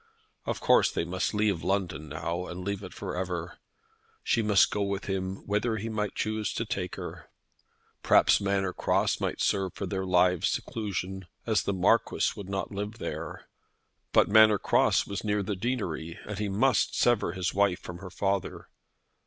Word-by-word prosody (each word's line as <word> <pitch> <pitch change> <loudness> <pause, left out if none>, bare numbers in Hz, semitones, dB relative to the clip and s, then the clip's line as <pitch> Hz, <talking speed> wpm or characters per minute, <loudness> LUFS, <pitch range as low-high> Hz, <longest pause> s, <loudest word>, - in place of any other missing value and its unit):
Of - - -1
course - - +4
they - - -1
must 90 +2 -1
leave 105 -5 0
London 90 -7 -1
now, 85 +4 -3
and 90 +1 -6
leave 100 -1 -2
it 95 - -8
for 95 -2 -6
ever. 90 -2 -4 0.6
She 115 - +2
must 105 -3 +4
go 105 - -1
with 100 0 -2
him 95 0 -3
whither 105 +2 0
he 110 +2 -4
might 105 -2 -2
choose 110 0 -1
to 115 - -2
take 95 -4 -3
her. - - -8 0.7
Perhaps - - +5
Manor 100 -2 0
Cross - - +1
might - - -2
serve 95 -2 0
for 100 - -4
their 95 0 -3
lives' 90 -1 +3
seclusion, 95 -4 -3 0.2
as 110 -2 +2
the 100 - -1
Marquis 95 +5 +2
would 100 -3 -8
not 95 -2 -3
live 105 +2 -4
there. - - -6 0.6
But - - +5
Manor 110 0 +7
Cross - - +3
was 100 0 -5
near 105 -1 0
the 100 +1 -2
deanery, 95 -7 -3
and 105 -1 -5
he 105 -1 -1
must 115 +4 +2
sever 120 -8 +2
his 90 -2 -2
wife 100 -2 +2
from 90 0 -8
her 95 0 -8
father. 100 +1 -2
100 Hz, 175 wpm, -28 LUFS, 90-105 Hz, 0.7 s, Manor